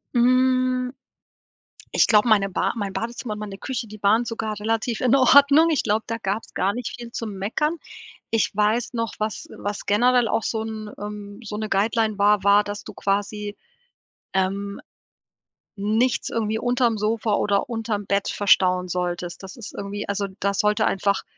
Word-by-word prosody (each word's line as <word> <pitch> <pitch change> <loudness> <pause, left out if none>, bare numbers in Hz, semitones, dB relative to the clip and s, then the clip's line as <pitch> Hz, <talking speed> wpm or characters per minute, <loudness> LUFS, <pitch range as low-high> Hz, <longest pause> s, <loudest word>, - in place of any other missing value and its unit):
Hm, 255 +1 +3 1.0
ich - - +4
glaube, 210 +1 +4
meine 200 -2 +4
Ba - - 0
mein 200 -4 -3
Badezimmer 235 0 -4
und 210 - -7
meine 205 -2 -6
Küche, 245 0 -4
die 215 0 -11
waren 220 +4 +4
sogar 220 -2 -4
relativ 225 +2 -1
in 255 +1 +4
Ordnung. 280 +4 +6
Ich 300 - +2
glaube, 215 +1 +1
da 230 - -2
gab's 210 0 -4
gar 195 +2 +1
nicht 245 -1 -5
viel 235 -1 -9
zum 225 -3 -5
Meckern. 300 - -1 0.5
Ich 225 -1 +1
weiß 215 +4 +1
noch, 230 -1 -2
was 215 -2 -3
äh, - - -13
was 205 0 -4
generell 245 +3 +3
auch 225 - 0
so 220 0 -2
'n 220 -1 -6
ähm, 205 0 -7
so 210 -1 -5
'ne 215 0 -3
Guideline 215 +2 +1
war, 205 0 +4
war, 200 +1 +5
dass 205 0 -5
du - - -10
quasi, 205 +1 -2 0.8
ähm, 195 +1 -1 1.0
nichts 220 +5 +1
irgendwie 220 -1 -1
unterm 245 -1 +1
Sofa 215 +1 0
oder 200 -1 +1
unterm 225 -3 -3
Bett 200 +1 0
verstauen 185 -2 +3
solltest. 175 0 -3
Das 190 +6 -9
ist 230 - -9
irgendwie 200 +1 -5
also, 200 0 -1
da 200 0 0
sollte 210 +2 +2
einfach 200 0 +1
215 Hz, 170 wpm, -23 LUFS, 200-235 Hz, 1.0 s, Ordnung